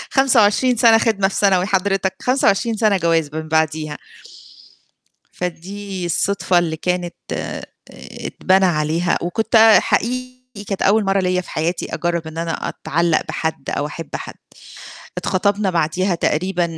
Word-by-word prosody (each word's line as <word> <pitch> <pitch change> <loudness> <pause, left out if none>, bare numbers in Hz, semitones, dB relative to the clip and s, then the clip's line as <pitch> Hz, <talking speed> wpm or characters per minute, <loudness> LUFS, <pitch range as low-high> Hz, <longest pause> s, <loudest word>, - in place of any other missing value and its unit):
25 250 -2 +3
سَنة 225 -1 +6
خدمة 215 -4 +1
في 195 - -6
ثانوي 190 -3 +3
حضرتك، 195 -1 0
25 235 -3 +1
سَنة 210 -2 +3
جواز 165 -3 +1
من 160 0 -5
بعديها، 155 -1 -1 1.4
فدي 185 +2 -5
الصدفة 185 +1 +1
اللي 165 -2 -1
كانت 180 +1 -2 0.2
آآ - - -5 0.6
اتبنى 190 +1 +2
عليها 165 +1 0
وكنت 220 +7 0 0.2
حقيقي 255 -2 -3
كانت 195 -1 -3
أول 210 +2 +3
مرّة 195 0 +1
ليّا 180 0 0
في 180 - -11
حياتي 165 +3 -2
أجرّب 170 -2 -2
إن 160 +1 -8
أنا 165 0 -2 0.2
أتعلّق 170 +1 0
بحد 160 -3 -3
أو 145 - -2
أحب 155 +1 -8
حد. - - -8 0.8
اتخطبنا 200 +1 0
بعديها 175 +2 0
تقريبًا 175 +2 0
185 Hz, 130 wpm, -19 LUFS, 165-205 Hz, 1.4 s, سَنة